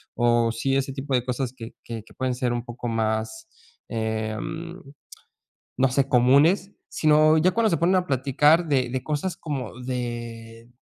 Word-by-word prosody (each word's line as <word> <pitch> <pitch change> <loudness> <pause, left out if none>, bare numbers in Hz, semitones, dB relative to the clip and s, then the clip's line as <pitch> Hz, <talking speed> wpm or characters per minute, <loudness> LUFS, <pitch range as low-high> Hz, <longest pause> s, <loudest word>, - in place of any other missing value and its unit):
o 120 -1 +2
sí, 135 +4 -1
ese 135 0 -1
tipo 135 0 -2
de 125 - +1
cosas 125 0 -2
que 115 -2 -10
que 115 -2 -7
que - - -19
pueden 130 -1 -2
ser 125 -1 -1
un 120 0 -3
poco 120 0 -6
más, 110 - -2 0.4
em, 110 +10 -4 1.0
no 135 +1 +3
sé, 135 +2 +1
comunes, 140 +11 +4 0.2
sino 155 0 +4
ya 180 +4 +3
cuando 225 +2 +2
se 165 - +2
ponen 170 +4 +2
a 180 0 0
platicar 145 +5 +3
de 135 -5 +1
de 130 0 -3
cosas 155 +5 -2
como 135 -6 -5
de 120 -2 -6
130 Hz, 165 wpm, -24 LUFS, 120-150 Hz, 1.0 s, comunes